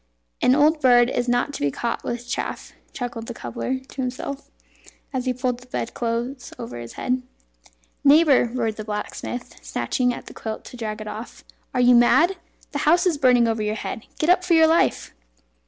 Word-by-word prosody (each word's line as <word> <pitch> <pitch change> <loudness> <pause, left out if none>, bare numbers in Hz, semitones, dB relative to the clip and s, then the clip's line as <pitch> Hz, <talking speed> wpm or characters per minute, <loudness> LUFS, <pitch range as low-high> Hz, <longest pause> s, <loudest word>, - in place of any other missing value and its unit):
"An 255 - +5
old 300 +1 +4
bird 245 -1 +5
is 245 0 -1
not 245 +4 +1
to - - -6
be 145 - +2
caught 235 - -3
with 240 0 -4
chaff," - - -4 0.2
chuckled 240 -3 -5
the 240 - -6
cobbler 125 - -3
to 265 +1 -8
himself; 265 +2 -5 0.6
and 260 -1 -1
he 255 - 0
pulled 250 -1 -2
the 250 - -17
bed 245 - -4
clothes 240 +2 -3
over 120 +1 -7
his 115 -1 -8
head. 255 0 -1 0.8
"Neighbour!" 285 -4 +6
roared 230 -3 -2
the 215 - -5
blacksmith, 210 +3 -5
snatching 250 -2 0
at - - -7
the - - -11
quilt 220 -1 -6
to - - -10
drag 215 -2 -4
it 215 - -7
off, 220 +3 -8 0.3
"are 250 - +1
you 245 0 +6
mad? 310 +10 +5 0.4
The 290 - -2
house 350 +3 +4
is 335 -6 +1
burning 250 -3 +5
over 225 -1 0
your 210 0 -1
head. 225 +1 -6
Get 315 +3 +3
up 365 0 +3
for 355 -2 +3
your 320 0 +7
life!" 325 +1 +2
245 Hz, 195 wpm, -23 LUFS, 230-275 Hz, 0.8 s, your